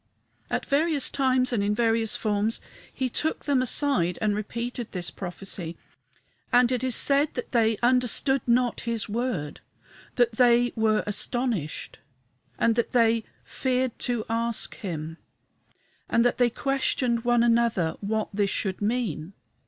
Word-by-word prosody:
At - - -2
various 295 0 +1
times 260 -2 +2
and 220 - +1
in 205 +1 0
various 225 -1 +1
forms 215 +1 -1 0.3
he 260 - -2
took 310 +6 -2
them 280 -3 +2
aside 255 - +1
and 210 -2 +1
repeated 235 +3 -4
this 180 -2 -3
prophecy. 175 -2 -6 0.7
And 245 0 +4
it 250 -1 -1
is 255 -2 +2
said 280 +1 +3
that 245 - -5
they 225 -2 +2
"understood 255 +2 +2
not 245 0 +2
his 230 -3 -2
word;" 210 - -3 0.6
that 235 -3 +2
"they 245 -1 +4
were 220 -1 +2
astonished;" 210 - -2 0.6
that 230 +2 +1
they 230 -2 +3 0.2
"feared 255 -2 -2
to 240 -3 -1
ask 230 0 -1
him;" 165 -5 -6 0.9
that 240 +2 +2
they 245 -1 +4
"questioned 255 -2 -1
one 240 -1 +3
with 235 0 +4
another 230 -8 +1
what 215 +1 -2
this 200 0 +1
should 190 -1 -2
mean." 205 -6 -2
235 Hz, 135 wpm, -26 LUFS, 210-250 Hz, 0.9 s, And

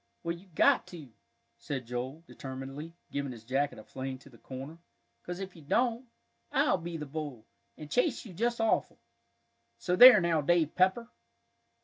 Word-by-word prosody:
"Well, 170 0 -2
you've 175 -1 -18
got - - +4
to," 160 -7 -10 0.5
said 130 -4 -4
Joel, 125 +6 -5
determinedly, 135 +4 -8 0.2
giving 140 -1 -3
his 115 -3 -10
jacket 135 +4 -1
a 110 - -10
fling 130 +2 -6
to 140 +1 -17
the 115 - -18
corner, 135 +5 -8 0.4
"'cause 175 +1 -6
if 190 -1 -7
you 165 - -13
don't, 235 - 0 0.4
I'll 270 -8 +2
be 170 0 -5
the 150 - -5
bull, 145 -6 -6 0.3
and 150 - -8
chase 250 - 0
you 200 - -10
just 235 +6 -1
awful. 225 -1 +1 0.8
So 180 +9 0
there 245 +1 +11
now, 170 -3 +1
Dave 165 0 +2
Pepper!" 190 +6 +2
160 Hz, 165 wpm, -30 LUFS, 135-190 Hz, 0.8 s, there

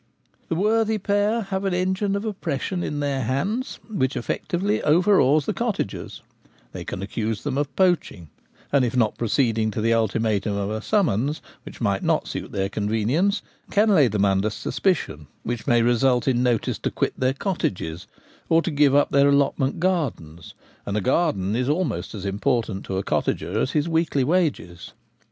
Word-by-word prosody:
The - - 0
worthy 220 +4 +2
pair 205 +3 +1
have 195 -1 -3
an 195 -2 0
engine 190 +2 0
of 200 +2 -3
oppression 180 -3 -3
in 145 -1 -3
their 140 -2 -1
hands 195 - -2
which 135 - -1
effectually 190 - -1
overawes 155 -3 +4
the - - -1
cottagers: 225 - -3 0.5
they - - -7
can 95 - -5
accuse 105 +1 -3
them 145 -3 -2
of 145 0 -2
poaching; 175 - 0 0.4
and 140 -2 +4
if 125 +1 -1
not 110 -3 +2
pro 120 - -2
ceeding 110 -3 +1
to - - -3
the 115 +2 +2
ultimatum 110 -2 0
of 100 +1 -2
a 110 0 -3
summons, 150 - +1 0.2
which - - -12
might - - +1
not - - +1
suit - - -5
their 95 0 -1
convenience, 115 - 0 0.3
can 210 +2 +3
lay 155 -10 +5
them 100 -2 +1
under 100 +2 +2
suspicion, 105 - -2 0.2
which 120 +1 -4
may 120 -3 +4
result 120 +1 +2
in 125 -2 +2
notice 120 -3 0
to - - -1
quit - - -1
their 130 0 +1
cottages, 90 - -3 0.4
or 165 0 +4
to 175 - -2
give 145 -2 +3
up 145 - +3
their 140 0 +5
allotment 140 -1 +1
gardens; 130 - -2 0.3
and 100 - -2
a - - 0
garden 110 - +1
is 125 +2 0
almost 145 - -1
as 100 -2 -6
important 105 0 -1
to 95 - -3
a 95 - -1
cottager 95 +3 -1
as 130 - -1
his 150 +1 +1
weekly 160 -4 +1
wages. 145 - -1
135 Hz, 175 wpm, -23 LUFS, 110-180 Hz, 0.5 s, lay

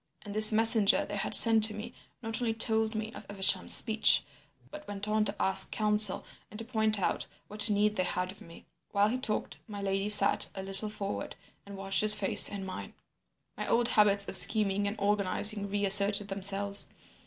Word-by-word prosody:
And 205 - -12
this 215 +1 +7
messenger 220 -1 +1
they 205 - -11
had 195 - -1
sent 225 -2 +7
to 215 -1 -6
me 230 +3 -12 0.3
not 225 +2 -6
only 225 -2 -5
told 220 0 -4
me 220 +1 -9
of - - -14
Evesham's 190 -2 +1
speech, 220 -1 +1 0.5
but 300 0 -15
went 205 0 -10
on 215 0 -4
to 200 0 -5
ask 190 - 0
counsel 210 -2 +3 0.2
and 210 - -15
to 230 - -10
point 220 -3 -2
out 185 - -5 0.2
what 210 +1 +1
need 210 +1 -3
they 185 - -4
had 180 0 -7
of 195 - -20
me. 165 0 -18 0.2
While 205 +1 -3
he 250 +3 -7
talked, 215 -4 -8
my 205 -2 -12
lady 195 +1 -6
sat 205 -1 +4
a 190 - -10
little 195 +2 -1
forward 200 -1 -10 0.3
and 200 -1 -14
watched 195 0 -3
his 215 0 +2
face 205 -2 +5
and 200 -2 -10
mine. 185 - -12 0.6
"My - - -10
old 235 +1 -3
habits 200 -3 -1
of - - -9
scheming 205 +1 +1
and 205 - -8
organising 205 +1 -2
reasserted 200 0 +2
themselves. 200 +1 -2
205 Hz, 190 wpm, -25 LUFS, 200-215 Hz, 0.6 s, this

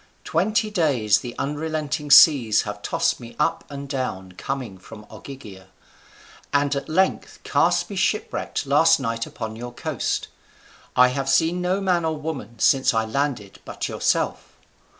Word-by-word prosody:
Twenty 215 +5 0
days 130 - +2
the 120 -1 -8
unrelenting 150 0 -3
seas 135 -7 +7
have 105 -1 -6
tossed 165 +8 0
me 120 -2 -11
up - - 0
and 140 -1 -7
down 125 -9 -4
coming 115 0 -5
from 105 +2 -12
Ogygia, 105 -9 -11 0.8
and 145 0 +1
at 140 +2 -4
length 190 +4 0
cast - - +2
me - - -7
shipwrecked - - -1
last - - +4
night 115 0 -3
upon 110 -1 -6
your 120 +2 -7
coast. 120 - -3 0.7
I 125 0 +6
have 135 +1 -3
seen 165 +6 +2
no 180 +2 0
man 180 -3 +1
or 160 -1 -1
woman 140 -8 -6
since 135 +1 +3
I 110 0 +1
landed 120 -5 -3
but - - -5
yourself. - - -1
135 Hz, 150 wpm, -23 LUFS, 115-155 Hz, 0.8 s, seas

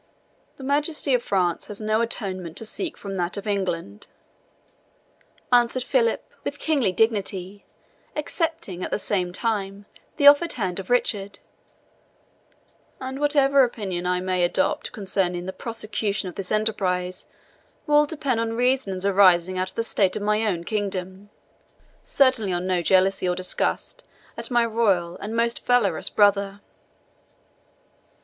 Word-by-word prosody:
"The 270 - -11
Majesty 290 +1 0
of 250 - +3
France 180 -6 0
has 205 - -7
no 215 +1 +1
atonement 185 -7 -4
to 225 - -3
seek 335 - -4
from 195 -1 -6
that 175 +2 -2
of 200 - -6
England," 175 - -3 1.4
answered 245 +1 +3
Philip, 470 - +1 0.2
with - - -4
kingly 275 -11 +1
dignity, 200 -2 -1 0.5
accepting, 305 - -3
at - - -3
the - - -1
same 190 -3 -1
time, 200 -1 -2 0.3
the 285 - +1
offered 290 +4 +7
hand 190 -5 -3
of 190 - -8
Richard; 205 -5 0 1.6
"and 265 +1 -5
whatever 280 -2 +4
opinion 195 -7 -3
I 180 0 0
may 185 -1 0
adopt 175 - 0
concerning 185 -3 -2
the 190 - -5
prosecution 215 -3 -3
of 180 - -6
this 190 0 -5
enterprise 185 -4 -1 0.6
will 295 -1 +4
depend 280 -6 -1
on 225 0 -1
reasons 240 -6 +1
arising 185 -2 +4
out 185 0 -1
of - - -11
the 230 - 0
state 195 -4 +1
of 210 - -3
my 210 +1 +1
own 175 -5 -1
kingdom 195 -1 -4 0.7
certainly 260 -8 +2
on 175 0 -2
no 185 -1 +1
jealousy 190 +1 +2
or 180 - 0
disgust 185 - -2 0.3
at - - -4
my 240 -2 +3
royal 200 -7 +1
and 215 +2 -6
most 235 0 0
valorous 220 -9 +2
brother." 200 -1 +2
205 Hz, 140 wpm, -24 LUFS, 185-240 Hz, 1.6 s, offered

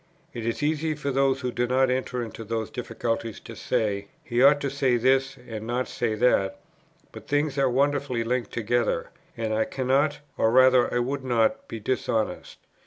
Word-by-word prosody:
It 115 -1 -5
is 115 +5 -2
easy 155 +1 0
for 140 -1 -3
those 135 0 +2
who 125 -1 -2
do 120 0 -1
not 130 +1 +2
enter 125 -1 -2
into 115 0 -8
those 110 0 -3
difficulties 115 -2 -3
to - - -10
say, 100 -2 -1 0.2
'He 120 +1 0
ought 140 +2 +6
to 140 - -1
say 135 -3 +2
this 135 +2 +2
and 110 -1 -6
not 125 +2 -1
say 115 -3 -2
that,' 100 -5 +2 0.5
but - - -11
things 145 -1 0
are 135 -1 +3
wonderfully 140 -2 +1
linked 120 -1 -1
together, 120 +1 -1 0.3
and 110 -1 -2
I 110 0 +1
cannot, 140 +3 +1 0.2
or 110 - +4
rather 130 +1 +5
I - - 0
would 130 +3 -1
not 120 -3 +1
be 115 - -6
dishonest. 110 -1 -2
125 Hz, 180 wpm, -26 LUFS, 115-135 Hz, 0.5 s, ought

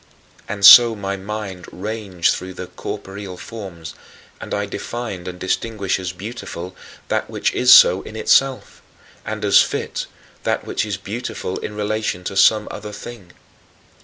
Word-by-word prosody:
" - - -27
And 100 -1 0
so 120 +1 +10
my 100 -1 -3
mind 100 -2 -6
ranged 100 -3 -1
through 95 0 -7
the - - -6
corporeal 95 -1 -7
forms, 95 -7 -9 0.5
and - - -8
I 100 0 -1
defined 100 -3 -6
and 90 0 -6
distinguished 100 +1 -1
as 90 -1 -4
"beautiful" 90 -2 -8 0.3
that - - -1
which - - -1
is 125 0 +4
so 95 -5 +8
in 110 - -11
itself 135 +4 +1 0.5
and 110 0 -3
as 100 - +6
"fit" - - -3 0.3
that - - -1
which - - -2
is 100 -3 -3
beautiful 100 -2 -5
in 105 - -6
relation 105 -3 -2
to 95 - -5
some 105 +2 +4
other 105 0 -7
thing. 105 -4 -10
100 Hz, 155 wpm, -20 LUFS, 95-110 Hz, 0.5 s, so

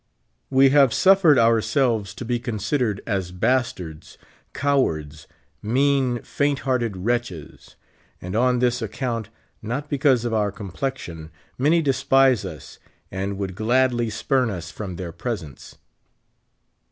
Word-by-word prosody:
We 135 0 +5
have 135 -3 +4
suffered 190 -6 +5
ourselves 115 -1 +2
to 120 - -7
be 120 +1 -1
considered 110 -1 -2
as 95 -5 -2
dastards, 90 -6 -2 0.3
cowards, 80 - -1 0.3
mean, 130 +1 +1
faint 145 -1 -1
hearted 120 -6 -1
wretches; 105 -5 -4 0.4
and 90 +2 -6
on 125 +2 +3
this 125 0 +1
ac 110 -2 -5
count 115 -5 -3 0.3
(not 130 +7 -4
because 135 -4 +2
of 120 - -2
our 105 -2 +1
complexion) 95 - -6 0.3
many 160 +5 +2
despise 135 -3 +3
us, - - -10 0.3
and 95 +1 -3
would 95 -1 -4
gladly 120 +3 +1
spurn 125 +3 0
us 85 -5 -6
from 95 -2 -6
their 85 -1 -6
presence. 85 - -7
120 Hz, 125 wpm, -23 LUFS, 100-130 Hz, 0.4 s, We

